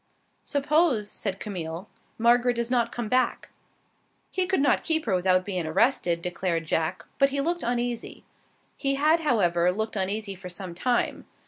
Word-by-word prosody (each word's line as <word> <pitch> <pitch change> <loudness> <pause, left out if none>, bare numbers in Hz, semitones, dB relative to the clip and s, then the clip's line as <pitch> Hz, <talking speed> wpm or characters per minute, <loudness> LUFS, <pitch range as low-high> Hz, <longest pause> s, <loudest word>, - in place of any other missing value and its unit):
"Suppose," 285 -6 +1
said 195 -2 -3
Camille, 175 -2 -5 0.3
"Margaret 240 +1 +3
does 235 +1 -2
not 235 -2 +2
come 240 -2 -4
back?" 255 +3 0 0.8
"He 370 -1 0
could 380 - +1
not 285 - +3
keep 320 -1 0
her 215 - 0
without 185 0 +2
bein' 180 -5 -2
arrested," 170 -3 +1
declared 175 -2 -1
Jack, 160 +3 -1
but 275 - +5
he 280 +1 -2
looked 340 +5 0
uneasy. 240 0 -3 0.5
He 275 -1 0
had, 305 +4 +3
however, 180 - +2
looked 220 +4 -3
uneasy 200 +1 -1
for 180 -1 -9
some 180 0 -5
time. 240 +7 -1
220 Hz, 155 wpm, -26 LUFS, 185-270 Hz, 0.8 s, but